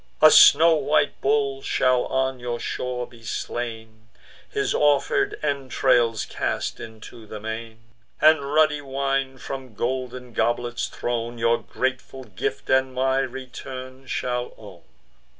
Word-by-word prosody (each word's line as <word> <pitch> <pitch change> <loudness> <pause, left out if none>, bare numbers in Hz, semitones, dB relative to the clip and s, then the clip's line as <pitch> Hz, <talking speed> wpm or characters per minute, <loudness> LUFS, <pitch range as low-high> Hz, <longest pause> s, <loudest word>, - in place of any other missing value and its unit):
A 155 0 +8
snow 165 +3 +8
white 150 -2 +1
bull 140 -1 +1
shall 130 -2 +2
on 130 0 -1
your 120 -1 -4
shore 125 0 -3
be 120 -1 -17
slain; 110 -1 -5 0.4
His 415 -1 -1
offer'd 145 -2 +2
entrails 130 -5 +1
cast - - -3
into 110 0 -11
the 105 - -7
main, 110 +1 -6 0.4
And 150 -2 +4
ruddy 155 -1 +3
wine, 135 -1 -2
from 130 -3 -7
golden 125 +1 -3
goblets 120 +1 -1
thrown, 120 0 -3
Your 115 0 +2
grateful 130 0 -3
gift 105 -1 -4
and 130 0 +2
my 130 +1 +2
return 130 0 -7
shall 125 -1 -3
own." - - -13
130 Hz, 125 wpm, -24 LUFS, 120-135 Hz, 0.4 s, A